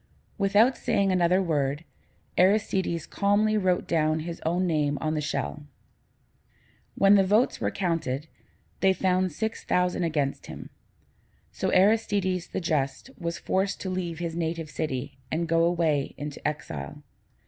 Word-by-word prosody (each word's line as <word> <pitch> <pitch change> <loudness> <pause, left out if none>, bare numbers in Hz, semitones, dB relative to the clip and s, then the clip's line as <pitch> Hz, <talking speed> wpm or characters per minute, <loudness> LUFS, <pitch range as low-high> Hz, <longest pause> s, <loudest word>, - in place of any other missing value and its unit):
Without 210 +6 +4
saying 195 -1 +1
another 180 +1 +3
word, 145 -2 -1 0.5
Aristides 185 -3 +2
calmly 205 +2 +2
wrote 185 -4 +1
his 160 +1 0
own 175 +3 +1
name 150 -4 +1
on 155 0 -1
the 155 - -1
shell. 150 0 -3 1.3
When 195 0 +5
the 200 -1 +6
votes 210 +6 +2
were - - +1
counted, 165 -6 -2 0.5
they 190 0 +4
found 185 -1 +1
six 220 +8 -3
thousand 180 0 +1
against 150 -4 -1
him: - - -9 0.8
so - - -2
Aristides 195 -2 +2
the - - -3
Just 155 - -2
was 170 -1 -3
forced 195 +1 -1
to 190 - -3
leave 175 -3 -3
his 170 -1 -4
native 165 -2 -3
city, 135 -3 -4
and 165 +2 -1
go 165 0 +3
away 165 -5 +1
into 145 0 -4
exile. 150 0 -5
170 Hz, 135 wpm, -27 LUFS, 155-190 Hz, 1.3 s, the